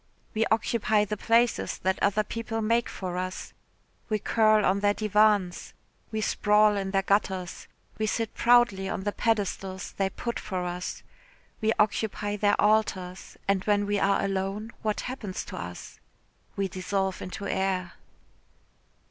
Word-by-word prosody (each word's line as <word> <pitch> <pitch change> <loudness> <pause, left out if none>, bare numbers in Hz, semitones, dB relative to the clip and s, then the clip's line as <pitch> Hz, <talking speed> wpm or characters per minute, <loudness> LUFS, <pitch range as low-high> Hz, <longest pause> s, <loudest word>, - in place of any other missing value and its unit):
"We 220 +1 +1
occupy 220 -1 +2
the 210 - -3
places 230 +2 +2
that 190 0 0
other 205 +1 +2
people 225 +1 -4
make 230 +2 +1
for 180 -2 -5
us. 185 0 -5 0.6
We 215 - +2
curl 215 0 +3
on 195 +2 +2
their 205 0 +2
divans, 210 -3 +2 0.4
we 220 0 -2
sprawl 210 0 +3
in 195 -1 -2
their 195 0 +1
gutters, 190 -3 -1 0.3
we 215 - +1
sit 225 +1 -1
proudly 235 -6 +4
on 195 -2 -3
the 205 - 0
pedestals 195 -4 -1
they 195 -1 +1
put 235 +4 -4
for 185 -3 -3
us, 180 +1 -5 0.6
we 220 0 +2
occupy 210 0 0
their 205 0 +2
altars, 190 -4 0
and 195 -1 +2
when 205 -1 +2
we 205 0 0
are 200 0 +2
alone, 195 +3 -2
what 215 -1 -1
happens 240 -7 -5
to - - -8
us? - - -8 0.6
We 200 -2 0
dissolve 190 +1 -2
into 190 +2 -6
air." 190 -2 -1
205 Hz, 150 wpm, -27 LUFS, 190-215 Hz, 0.6 s, proudly